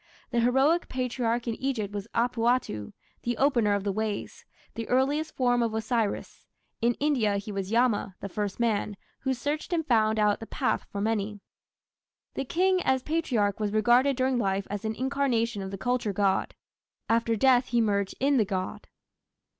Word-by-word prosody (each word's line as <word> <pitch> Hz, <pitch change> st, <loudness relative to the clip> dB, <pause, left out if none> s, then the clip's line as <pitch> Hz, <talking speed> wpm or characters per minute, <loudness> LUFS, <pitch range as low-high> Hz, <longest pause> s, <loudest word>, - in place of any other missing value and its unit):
The 240 Hz, -, +1 dB
heroic 265 Hz, +8 st, +3 dB
Patriarch 245 Hz, -2 st, -1 dB
in 230 Hz, -, 0 dB
Egypt 225 Hz, -7 st, -2 dB
was 205 Hz, 0 st, -5 dB
Apuatu, 235 Hz, -, 0 dB, 0.3 s
"the 240 Hz, -1 st, -2 dB
opener 235 Hz, -7 st, +3 dB
of 200 Hz, -, -2 dB
the 200 Hz, -, 0 dB
ways", 215 Hz, 0 st, -4 dB, 0.3 s
the 230 Hz, -1 st, -6 dB
earliest 285 Hz, +5 st, +1 dB
form 245 Hz, -2 st, +2 dB
of 230 Hz, -2 st, 0 dB
Osiris; 220 Hz, -1 st, -2 dB, 0.3 s
in 235 Hz, +1 st, +2 dB
India 245 Hz, -9 st, +1 dB
he 205 Hz, +1 st, -5 dB
was 195 Hz, -1 st, -3 dB
Yama, 225 Hz, -5 st, +1 dB
the -, -, -5 dB
first 205 Hz, +1 st, -3 dB
man, 210 Hz, -3 st, 0 dB, 0.2 s
"who 265 Hz, 0 st, -1 dB
searched 290 Hz, +8 st, -3 dB
and 330 Hz, -2 st, 0 dB
found 220 Hz, -4 st, +3 dB
out 210 Hz, -1 st, +2 dB
the 225 Hz, -, -8 dB
path -, -, -1 dB
for 200 Hz, -, -3 dB
many". 210 Hz, -1 st, -1 dB, 0.9 s
The 270 Hz, -, -3 dB
King 370 Hz, +5 st, +2 dB
as 260 Hz, -4 st, +1 dB
Patriarch 245 Hz, -12 st, 0 dB
was 210 Hz, -1 st, -1 dB
regarded 240 Hz, +5 st, +4 dB
during 255 Hz, 0 st, +1 dB
life 195 Hz, -2 st, 0 dB
as 205 Hz, -1 st, -4 dB
an 220 Hz, 0 st, -2 dB
incarnation 245 Hz, -5 st, 0 dB
of 190 Hz, -, -5 dB
the 195 Hz, -, -6 dB
culture 240 Hz, -1 st, -1 dB
god: 195 Hz, -1 st, +1 dB, 0.5 s
after 230 Hz, 0 st, +2 dB
death 250 Hz, +2 st, +4 dB
he 240 Hz, -, +1 dB
merged 200 Hz, -3 st, 0 dB
in 275 Hz, +1 st, +3 dB
the 225 Hz, -, +4 dB
god. 185 Hz, -2 st, -4 dB
230 Hz, 170 wpm, -27 LUFS, 205-255 Hz, 0.9 s, regarded